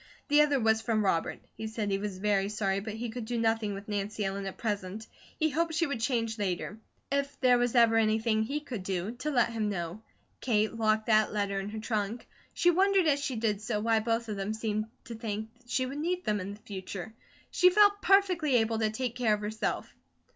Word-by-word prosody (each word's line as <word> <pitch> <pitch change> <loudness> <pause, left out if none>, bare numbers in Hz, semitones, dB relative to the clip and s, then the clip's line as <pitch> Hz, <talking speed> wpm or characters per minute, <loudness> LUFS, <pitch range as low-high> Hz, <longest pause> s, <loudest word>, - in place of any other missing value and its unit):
The 295 +1 +6
other 290 -2 +3
was 220 -1 +3
from 220 -2 0
Robert. 165 -4 0
He 220 - -5
said 220 -2 -3
he 195 - +1
was 200 -2 -4
very 200 0 +1
sorry, 195 -2 0
but 215 +1 -6
he 230 0 -4
could 235 -1 -5
do 240 +1 -2
nothing 225 -2 +1
with 200 +1 -9
Nancy 205 0 -2
Ellen 195 0 -3
at 190 - -7
present. 205 -1 -3 0.3
He 315 -1 +2
hoped 325 +2 0
she 335 +1 +2
would 280 -6 -3
change 230 -2 -1
later. 200 +2 -2 0.3
If 280 0 -1
there 250 -2 +5
was 245 0 0
ever 230 -2 +6
anything 220 0 +2
he 280 +7 -2
could 245 -8 -6
do, 185 +2 -2
to 295 +5 -3
let 240 -5 +2
him 220 -2 -1
know. 175 +1 -4 0.4
Kate 220 -3 +1
locked 215 -1 +1
that 215 -1 +4
letter 200 -1 0
in 195 +1 -4
her 220 +1 -5
trunk. 215 +1 -2 0.2
She 350 +1 +3
wondered 385 +1 +3
as 290 -2 +3
she 265 - -2
did 215 -2 0
so 215 0 -1
why 225 +1 +2
both 230 +1 -1
of 210 -2 -4
them 200 +2 -2
seemed 215 -1 -1 0.2
to 235 - -8
think 220 -1 -4 0.2
she 255 +1 0
would 275 +3 -5
need 360 +3 -1
them 210 -1 +1
in 200 +2 -5
the 210 - -20
future. 195 0 -7 0.4
She 365 - +6
felt 405 +1 +5
perfectly 365 -8 +3
able 225 -1 +2
to 220 -1 +2
take 235 +2 -3
care 240 -4 +2
of 210 - -8
herself. 215 +1 -3
220 Hz, 220 wpm, -30 LUFS, 210-250 Hz, 0.4 s, The